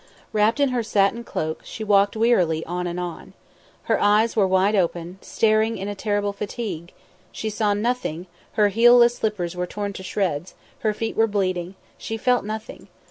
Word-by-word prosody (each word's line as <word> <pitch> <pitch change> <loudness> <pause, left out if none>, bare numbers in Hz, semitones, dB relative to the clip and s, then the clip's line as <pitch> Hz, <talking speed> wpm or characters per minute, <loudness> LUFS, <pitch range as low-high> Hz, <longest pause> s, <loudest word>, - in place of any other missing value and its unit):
Wrapped 215 +5 +2
in 280 -1 +3
her 250 -1 0
satin 215 +1 +1
cloak, 155 -8 -4
she 220 - -7
walked 205 0 +3
wearily 180 -9 +2
on 180 +1 -3
and 175 +1 -4
on. 175 -2 -6 0.5
Her - - 0
eyes 210 +2 +3
were 205 -4 +3
wide 190 +2 +3
open, 175 -1 -1
staring 220 0 +1
in 195 +1 -5
a 205 - -3
terrible 205 0 -1
fatigue; 200 -5 -5 0.4
she 220 - -4
saw 210 -1 +1
nothing; 210 -6 -2 0.3
her 210 -1 +3
heelless 240 +3 +6
slippers 185 -5 -2
were 180 0 -2
torn 205 +1 -4
to 190 - -8
shreds, 185 -4 -2 0.2
her 215 -1 0
feet 225 +1 -3
were 225 0 +3
bleeding; 185 -3 -2 0.2
she 225 - -4
felt 250 +2 +2
nothing. 215 +1 -7
205 Hz, 175 wpm, -23 LUFS, 185-225 Hz, 0.5 s, heelless